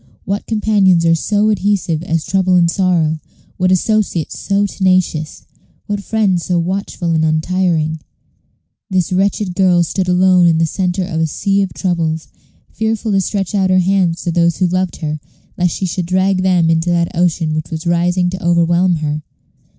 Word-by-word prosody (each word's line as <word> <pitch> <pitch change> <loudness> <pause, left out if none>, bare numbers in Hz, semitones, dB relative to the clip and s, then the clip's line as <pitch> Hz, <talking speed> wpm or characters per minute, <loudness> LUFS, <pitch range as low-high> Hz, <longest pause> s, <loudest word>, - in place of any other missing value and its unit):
What 200 +1 -3
companions 205 -6 +2
are 165 - +4
so 210 +6 +1
adhesive 195 -6 0
as 165 -2 -2
trouble 185 0 +1
and 170 -1 +3
sorrow? 170 -5 +1 0.4
what 185 0 +1
associates 185 -3 0
so 200 0 0
tenacious, 185 -5 -1 0.4
what 205 -1 -3
friends 200 -5 0
so 180 - 0
watchful 180 0 -2
and 160 -1 +1
untiring? 160 0 0 0.9
This 185 -2 0
wretched 195 0 0
girl 180 -2 +3
stood 185 +2 -2
alone 180 0 +4
in 165 -1 +3
the 165 - +2
centre 185 +3 -1
of 160 -3 -3
a 160 - +1
sea 195 +6 0
of 195 - -2
troubles, 165 -4 -2 0.4
fearful 220 0 -2
to 195 -1 +2
stretch 195 0 -3
out 190 -2 +1
her 185 - +3
hands 180 -2 +1
to 175 - -1
those 170 0 +1
who 185 - +1
loved 185 0 -1
her, 155 -1 -3 0.4
lest 180 -2 0
she 190 - -2
should 180 -1 -3
drag 185 +1 +1
them 180 -3 +2
into 165 +1 0
that 170 -1 0
ocean 165 -2 0
which 155 0 -3
was 160 0 -5
rising 175 +1 +1
to 185 0 -6
overwhelm 170 +1 +2
her. 150 +1 -2
180 Hz, 175 wpm, -16 LUFS, 165-190 Hz, 0.9 s, are